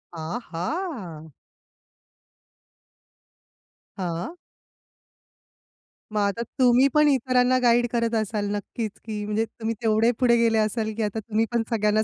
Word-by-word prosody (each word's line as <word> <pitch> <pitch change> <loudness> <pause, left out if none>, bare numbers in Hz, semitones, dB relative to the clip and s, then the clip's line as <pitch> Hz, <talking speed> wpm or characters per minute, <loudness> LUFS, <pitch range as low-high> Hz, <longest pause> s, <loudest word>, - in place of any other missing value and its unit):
आहा! 175 - -5 2.7
हां. 175 - -4 1.8
मग - - -1
आता 205 +3 0 0.2
तुम्ही 255 +1 +5
पण 300 0 +5
इतरांना 255 -1 +3
गाईड 240 0 +4
करत 235 -1 0
असाल 215 -1 -1
नक्कीच, 215 +1 -4
की 215 -2 -4
म्हणजे 210 +2 0
तुम्ही 225 0 -5
तेवढे 225 +1 +3
पुढे 240 -2 +4
गेले 230 -1 +3
असाल, 220 0 0
की 225 - 0
आता 210 +1 -2
तुम्ही 220 +1 0
पण 235 -1 +1
सगळ्यांना 215 -1 +2
225 Hz, 115 wpm, -25 LUFS, 210-240 Hz, 2.7 s, तुम्ही